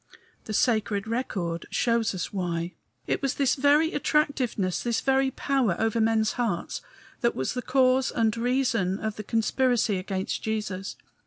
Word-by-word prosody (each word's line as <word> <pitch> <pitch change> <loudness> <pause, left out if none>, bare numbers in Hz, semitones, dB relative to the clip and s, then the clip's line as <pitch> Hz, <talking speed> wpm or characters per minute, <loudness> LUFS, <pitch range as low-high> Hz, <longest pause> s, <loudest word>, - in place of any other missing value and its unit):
The 215 - -5
sacred 215 -3 +1
record 190 -8 -3
shows 230 -3 +1
us 180 - -4
why. 175 -2 -2 0.3
It - - -1
was 275 -2 0
this 275 -2 +2
very 290 +4 +3
attractiveness, 275 - 0
this 235 -1 0
very 270 0 +2
power 260 -7 0
over 225 0 +1
men's 220 -1 +2
hearts, 225 -8 -2 0.4
that 235 - +1
was 130 - -2
the 250 - -3
cause 255 0 +3
and 225 -2 +1
reason 230 -6 0
of 215 -1 -3
the 215 - -5
conspiracy 225 -1 +1
against 190 0 -3
Jesus. 210 -3 -3
225 Hz, 150 wpm, -26 LUFS, 200-255 Hz, 0.4 s, very